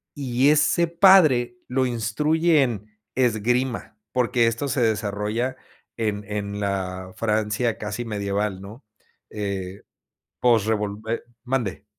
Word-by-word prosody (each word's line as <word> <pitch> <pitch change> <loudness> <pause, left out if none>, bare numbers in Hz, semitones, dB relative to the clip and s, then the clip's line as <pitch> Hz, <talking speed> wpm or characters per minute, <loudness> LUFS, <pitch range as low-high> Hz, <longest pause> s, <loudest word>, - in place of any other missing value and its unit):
y 135 -1 +2
ese 155 +3 +3
padre 160 -9 +5
lo 130 +1 +1
instruye 150 +8 +2
en 110 -6 -3 0.3
esgrima, 125 0 0
porque, 120 -1 +2
esto 115 +5 -1
se 135 -1 0
desarrolla 110 +3 -1 0.4
en 105 -2 -1
en 105 -1 -4
la 95 -2 -3
Francia 110 +2 0
casi 105 +3 -4
medieval, 100 -2 -2
¿no? 105 +6 -11 0.5
Eh, 100 -2 -4 0.6
post 115 -4 +3
revol 105 -2 -1
Eh, 115 - -1 0.2
mande 125 -6 -2
115 Hz, 115 wpm, -24 LUFS, 105-130 Hz, 0.6 s, padre